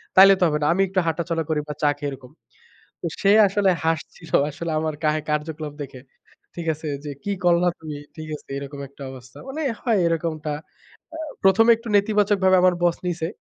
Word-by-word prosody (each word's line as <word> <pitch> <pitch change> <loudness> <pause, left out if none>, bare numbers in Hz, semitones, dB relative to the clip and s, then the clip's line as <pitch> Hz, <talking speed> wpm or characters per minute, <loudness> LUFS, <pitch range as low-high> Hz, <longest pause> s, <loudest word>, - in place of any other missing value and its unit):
তাইলে 195 +1 +9
তো - - +2
হবে 150 -1 0
না। - - +1
আমি 195 - +1
একটু 190 -1 +1
হাঁটাচলা 165 0 -1
করি 155 -1 +1
বা 150 - -4
চা 145 - +5
খেয়ে, 145 -1 -3
এরকম। 130 -1 -11 0.7
তো - - -5 0.2
সে 200 0 +4 0.2
আসলে 195 0 +2 0.2
হাসছিল 165 +1 -3 0.2
আসলে, 160 +3 -5
আমারে 155 -2 -2
কা 155 - +4 0.2
কার্যকলাপ 150 0 -3
দেখে। 130 -2 -10 0.5
ঠিক 170 -1 -5
আছে 155 +1 -8 0.2
যে, 145 - -4
কি 205 - -1
করলা 175 0 +4
তুমি, 155 -2 -6 0.2
ঠিক 155 -1 -8
আছে - - -23
এরকম 140 0 -7
একটা 140 0 -11
অবস্থা। 130 -1 -13
মানে 310 +4 -4 0.2
হয় 230 -5 +2
এরকমটা, 155 -2 -2 0.6
আ - - -5 0.3
প্রথমে 225 +5 +6
একটু 230 0 -11
নেতিবাচকভাবে 200 -2 +3
আমার 185 -1 +5
বস 175 -1 +3
নিছে। 165 -2 -2
165 Hz, 190 wpm, -23 LUFS, 150-190 Hz, 0.7 s, তাইলে